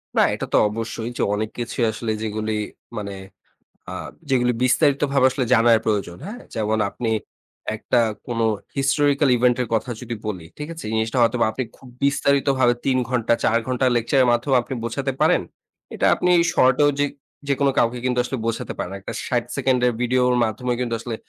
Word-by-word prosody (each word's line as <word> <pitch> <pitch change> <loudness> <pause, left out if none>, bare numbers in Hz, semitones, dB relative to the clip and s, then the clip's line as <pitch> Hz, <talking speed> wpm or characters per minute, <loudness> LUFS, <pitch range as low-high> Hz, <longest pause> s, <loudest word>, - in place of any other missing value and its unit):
না, - - +5
এটা - - -4
তো - - +5
অবশ্যই 115 +1 -4
যে - - -1
অনেক 110 +1 -1
কিছুই 120 0 -1
আসলে 110 +1 -3
যেগুলি 110 0 -2 0.4
মানে 100 -1 -4 0.8
আ - - -6 0.4
যেগুলি 125 -2 +3
বিস্তারিত 140 +2 +3
ভাবে 135 -2 +4
আসলে 130 0 -1
জানার 115 -1 +5
প্রয়োজন, 100 -5 -1
হ্যাঁ? 235 +5 -8
যেমন 110 0 0
আপনি 115 +1 -3 0.7
একটা 120 +3 0 0.3
কোনো 115 -2 -1 0.3
হিস্টোরিক্যাল 140 +1 +2
ইভেন্ট 125 0 +3
এর 120 - -4
কথা 115 +3 -1
যদি 120 -1 -5
বলি, 95 -6 -4
ঠিক 150 0 -5
আছে? 165 - -9
এই - - -4
জিনিসটা 110 +3 0
হয়তোবা 115 0 +3
আপনি 130 - -2
খুব 130 - -15 0.2
বিস্তারিতভাবে 140 -3 +3
৩ 130 -1 +2
ঘন্টা 120 -2 +2
৪ 115 - +3
ঘন্টা 130 0 +1
লেকচারের 125 +2 +2
মাধ্যমে 130 +3 +2
আপনি 130 - -6
বোঝাতে 135 +4 -2
পারেন। - - +4 0.5
এটা - - +1
আপনি 180 - 0 0.2
শর্টেও 130 +3 +4
যে 145 - +3 0.4
যেকোনো 140 0 +2
কাউকে 120 +1 +2
কিন্তু 125 -1 0
আসলে 130 +1 -3
বোঝাতে 115 0 -2
পারেন। 90 - -4
একটা 95 - -6
৬০ 120 -2 0
সেকেন্ডের 125 -2 +2
ভিডিওর 125 0 +2
মাধ্যমে 115 +3 -2
কিন্তু 120 -2 -1
আসলে 115 0 -5
125 Hz, 175 wpm, -22 LUFS, 115-135 Hz, 0.8 s, না